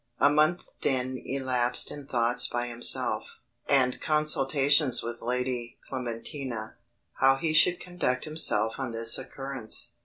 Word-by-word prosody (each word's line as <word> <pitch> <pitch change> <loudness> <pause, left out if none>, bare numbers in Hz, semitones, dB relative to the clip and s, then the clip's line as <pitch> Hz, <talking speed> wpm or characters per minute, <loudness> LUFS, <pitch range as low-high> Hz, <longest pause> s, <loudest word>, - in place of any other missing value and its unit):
A 145 - +4
month 155 +4 +2 0.2
then 130 -1 -1
elapsed 130 -2 0
in 145 -2 -9
thoughts 120 0 +1
by 120 0 -2
himself, 120 0 +3 0.5
and 130 -3 +2
consultations 145 -3 +2
with 120 0 -6
Lady 125 -1 -3
Clementina, 125 -2 -5 0.4
how 135 0 +5
he 155 +3 -2
should 175 +3 +5
conduct 175 -8 -2
himself 115 -8 +1
on 130 -3 -4
this 115 +1 +2
occurrence. 135 -3 -3
130 Hz, 125 wpm, -27 LUFS, 120-145 Hz, 0.5 s, how